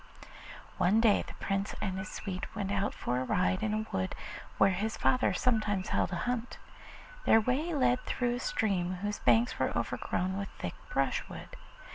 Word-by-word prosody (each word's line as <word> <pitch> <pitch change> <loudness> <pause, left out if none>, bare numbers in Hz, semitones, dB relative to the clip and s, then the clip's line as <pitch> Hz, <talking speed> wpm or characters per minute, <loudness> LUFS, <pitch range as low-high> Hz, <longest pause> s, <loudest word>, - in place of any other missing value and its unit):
One 200 +5 +4
day 225 -3 +4
the - - -9
Prince 195 +1 -2
and 190 -3 -2
his 190 - -5
suite 185 -3 -5
went 200 -2 -2
out 200 0 +1
for 125 +1 -1
a - - -1
ride 185 +7 +1
in 215 -1 0
a 215 0 -1
wood 95 0 -1 0.4
where 195 - +5
his 215 +4 -2
father 255 0 +3
sometimes 210 -6 +1
held - - +1
a - - -1
hunt. 245 -1 -2 0.7
Their 225 - +7
way 275 +9 0
led 250 -2 +3
through 240 -1 0
a 245 - -2
stream 195 - 0
whose 205 0 -2
banks 235 +2 +3
were - - +1
overgrown 190 +2 -1
with 200 - -4
thick - - -4 0.2
brushwood. - - -1
210 Hz, 175 wpm, -31 LUFS, 190-240 Hz, 0.7 s, Their